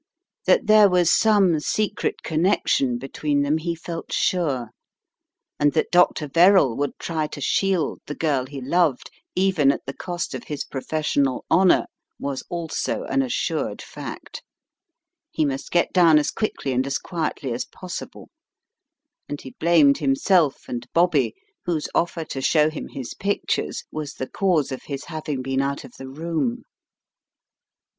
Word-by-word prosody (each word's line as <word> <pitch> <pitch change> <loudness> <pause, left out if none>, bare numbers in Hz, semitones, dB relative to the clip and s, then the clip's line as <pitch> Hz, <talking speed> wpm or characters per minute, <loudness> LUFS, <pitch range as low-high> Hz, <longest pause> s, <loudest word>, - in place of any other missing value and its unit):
That - - +4
there 215 -1 +7
was 180 -2 +3
some 200 -7 +4
secret 210 +6 -1
connection 155 -7 +1
between 140 +3 -1
them 150 +3 +1
he 170 +1 -2
felt 165 0 -7
sure, 140 -10 0 0.9
and 145 0 +3
that 155 - 0
Dr. 175 -3 +3
Verrall 170 - +5
would 145 +2 -2
try 160 -2 -2
to 150 - -8
shield 185 +4 0
the 145 - -5
girl 140 -5 0
he 140 0 -7
loved, 150 0 +1 0.2
even 180 -7 +3
at - - -5
the 135 - -5
cost 175 -1 -4
of 130 - -6
his 150 -2 -4
pro 135 - -6
fessional 140 -4 0
honour, 185 0 +5 0.3
was 140 -1 -3
also 170 -2 -3
an 135 0 0
assured 130 -2 -2
fact. - - -8 0.9
He 155 - 0
must 135 -1 -3
get 175 - +1
down 170 -4 +6
as 150 - +1
quickly 215 -10 -2
and 130 +1 0
as 140 - 0
quietly 155 -7 -3
as 120 - -3
possible, 185 -1 -8 1.0
and 145 - -4
he 130 - -10
blamed 160 -4 +5
himself 145 +2 +2
and 120 0 -5
Bobby, 175 - +3 0.3
whose 160 -4 -1
offer 170 -1 0
to 135 - -5
show 155 +2 +3
him 155 - -6
his 130 -3 -7
pictures 200 +1 -2
was 155 -2 -5
the 130 - -4
cause 175 -8 +1
of 130 - -5
his 140 -2 -5
having 150 -5 -4
been 135 +1 0
out 140 0 -2
of - - -12
the 135 - -7
room. 170 - -2
155 Hz, 155 wpm, -23 LUFS, 135-175 Hz, 1.0 s, there